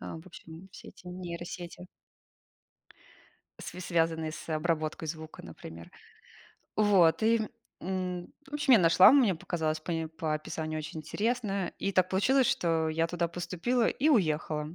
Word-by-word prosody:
Ам, 160 - -7
в - - -22
общем, 170 0 -12
все - - -12
эти 180 - -16
нейросети. 175 0 -7 1.7
С - - -7
связанные 165 -2 0
с 155 +1 -9
обработкой 155 0 -1
звука, 160 0 -7
например. 85 0 -11 0.9
Вот 200 -4 +4
и, 230 +1 +4
м, 220 - -3 0.3
м, 180 -1 -4 0.2
в 295 - -9
общем, 290 -3 +3
я - - +7
нашла, 170 +6 +7
мне 240 -10 +5
показалось 155 -2 -2
пои 165 -1 -3
по 160 -1 -3
описанию 155 +1 -4
очень 155 +1 -6
интересное. 200 +2 -2
И 195 - -1
так 185 0 +3
получилось, 255 +8 +3
что 165 -2 +1
я 165 +1 +1
туда 170 0 -1
поступила 180 +8 -1
и 300 +4 +1
уехала. 155 - +1
170 Hz, 145 wpm, -30 LUFS, 160-190 Hz, 1.7 s, я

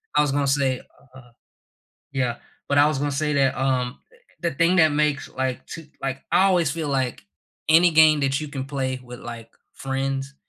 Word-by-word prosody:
I - - +5
was 145 -2 +1
gonna 140 0 +1
say, 135 -2 +1 0.3
uh 125 -2 -15 0.8
yeah. 125 -3 -1 0.3
But 140 - +2
I 145 +1 +6
was 150 -3 -1
gonna 145 +1 -1
say 150 +2 -1
that, 135 -2 +2
um, 130 -1 -1 0.4
the 170 -2 0
thing 165 +5 +2
that 160 -2 +6
makes 150 -1 0
like, 130 0 -3
2 165 -2 -9
like, 135 0 -3
I - - +5
always 175 -6 +2
feel 160 0 -3
like 130 -3 -1 0.5
any 170 +2 +6
game 155 -1 +6
that 135 0 +1
you 155 - -5
can 135 -2 -5
play 135 -2 -3
with, 125 0 -10
like, 115 -1 -9 0.2
friends 135 0 -3
140 Hz, 190 wpm, -23 LUFS, 130-150 Hz, 0.8 s, I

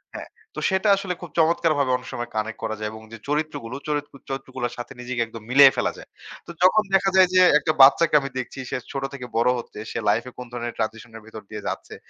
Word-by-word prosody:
হ্যাঁ, - - -7 0.3
তো - - -4
সেটা 190 +2 +1
আসলে 195 -2 -3
খুব 175 - -8
চমৎকারভাবে 155 -4 +2
অনেক - - -13
সময় 120 0 -4
কানেক্ট 110 +1 -3
করা 110 -1 -2
যায় 105 0 -3
এবং 110 - -10
যে - - -7
চরিত্রগুলো, 150 -5 -2
চরিত্র 145 -1 -3 0.2
চরিত্রগুলোর 130 -2 -4
সাথে 120 +2 -7
নিজেকে 120 -1 -3
একদম 115 -1 -11
মিলিয়ে 135 -1 +8
ফেলা - - +1
যায়। - - -13 0.4
তো - - -16
যখন 210 +3 +5
দেখা 195 0 +3
যায় 185 -1 +7
যে 185 - +6 0.2
একটা 155 - 0
বাচ্চাকে 150 +4 +6
আমি 135 - -5
দেখছি 130 +1 -6
সে - - -2
ছোট 135 -1 -4
থেকে 125 -3 -7
বড় 120 +2 +3
হচ্ছে। 115 - -10
সে - - -3
লাইফ 115 - +2
এ - - -15
কোন 125 - -7
ধরনের 120 -1 -5
ট্রানজিশন 110 +1 -4
এর 110 - -14
ভেতর 110 -1 -10
দিয়ে 105 -1 -8
যাচ্ছে, - - -5
130 Hz, 230 wpm, -23 LUFS, 115-155 Hz, 0.4 s, মিলিয়ে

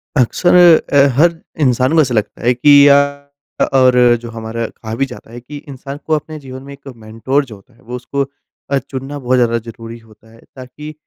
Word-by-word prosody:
अक्सर 145 +8 +2 0.4
अ, 140 - +5 0.2
हर 170 +3 +4 0.2
इंसान 130 0 +1
को 165 - +5
ऐसा 130 -4 -1
लगता 105 -2 -2
है 120 +1 +3
कि 145 +3 +6
या 140 0 +7 0.6
अ, - - +3
और 125 -2 +4
जो 120 - -8
हमारा, 115 0 -5
कहा 110 0 -9
भी 135 +4 0
जाता 125 -3 -13
है 120 - -9
कि 145 +5 -10
इंसान 140 +1 -8
को 160 - -1
अपने 155 +1 -6
जीवन 130 -1 -10
में 140 0 -11
एक 140 0 -16
मेंटोर 115 +6 -2
जो 115 -5 -12
होता 100 +5 -21
है, - - -26
वो 125 +2 -8
उसको 130 +3 -3 0.5
अ, 140 - +2
चुनना 135 +1 -6
बहुत 130 -1 0
ज़्यादा 115 -1 +1
ज़रूरी 115 0 -10
होता 110 0 -22
है 115 - -19 0.2
ताकि 140 +4 -10
125 Hz, 210 wpm, -16 LUFS, 115-140 Hz, 0.6 s, या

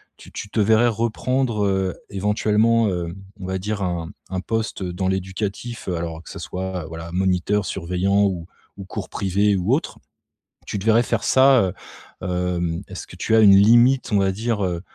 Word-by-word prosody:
tu - - -15
tu - - -6
te 110 - -2
verrais 110 +3 +4
reprendre, 115 0 0
heu, 95 -2 0 0.2
éventuellement, 105 +3 +2
heu, 85 -2 -3 0.2
on 95 - -7
va 95 0 -2
dire 100 +2 -3
un 85 -1 -2 0.2
un 95 - -2
poste 110 -1 -3
dans 90 +1 -2
l'éducatif? 95 +5 -3
Alors, 85 -2 -3
que - - -13
ça - - -8
soit 95 -2 -4
voilà, 80 +1 -8
moniteur, 95 +2 +1
surveillant 95 +3 0
ou 90 -4 -2 0.3
ou 100 - -8
cours - - -6
privé 100 +1 +1
ou 95 +7 +1
autre, 160 - -1 0.7
tu 100 - -4
te 95 - -7
verrais 115 +1 +5
faire - - -1
ça, 135 0 +5
heu? 95 0 -1 0.5
Hem, 90 -1 -2
est-ce 95 -1 -8
que - - -12
tu 110 - +1
as - - +6
une 100 -2 +8
limite, 120 +5 +5
on 100 - +5
va 95 -1 +2
dire, 110 +1 -2
heu, 85 -2 -2
95 Hz, 185 wpm, -22 LUFS, 90-110 Hz, 0.7 s, une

